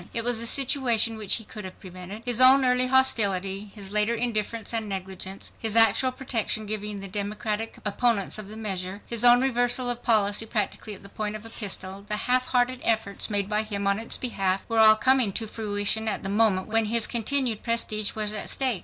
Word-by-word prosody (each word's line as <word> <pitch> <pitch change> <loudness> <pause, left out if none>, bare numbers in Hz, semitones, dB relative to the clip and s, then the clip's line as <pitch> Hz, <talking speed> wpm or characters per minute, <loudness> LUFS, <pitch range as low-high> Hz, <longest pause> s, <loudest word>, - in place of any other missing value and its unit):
It 230 - 0
was 240 -1 +2
a 230 - +1
situation 245 -4 +2
which 215 -3 0
he 225 - -4
could 210 0 -9
have 185 0 -10
prevented. 185 +3 -10
His 245 0 +2
own 260 +1 +6
early 250 0 +2
hostility, 200 -7 +2
his 200 -2 -9
later 210 +2 +1
indifference 230 -1 -3
and 220 -2 -2
negligence, 190 0 -6
his 225 0 0
actual 225 +3 +4
protection 235 -4 -3
given 210 -1 -4
to 195 - -6
Democratic 210 +2 -4
opponents 215 -1 0
of 210 - -8
the 215 - -9
measure, 195 -2 -5
his 235 -1 -1
own 245 0 +6
reversal 245 -1 +1
of 240 0 -5
policy 215 -2 +1
practically 215 -1 -3
at 190 - -15
the - - -10
point 210 +1 -5
of 215 +1 -9
a 225 - -10
pistol, 195 -2 -5
the 210 - -1
half 255 +1 +2
hearted 250 0 0
efforts 220 -2 -1
made 200 -2 0
by 210 0 0
him 205 -2 -5
on 200 +1 +1
its 225 - -3
behalf, 195 -6 -2
were 225 -1 -1
all 215 0 +7
coming 255 -2 +2
to 225 - 0
fruition 215 0 0
at 215 - -2
the 195 - -4
moment 205 -2 +1
when 225 0 0
his 230 +1 +2
continued 240 -1 +1
prestige 215 -3 -1
was 215 -1 -1
at 210 - -2
stake. 255 -7 +1
220 Hz, 205 wpm, -25 LUFS, 205-235 Hz, -, all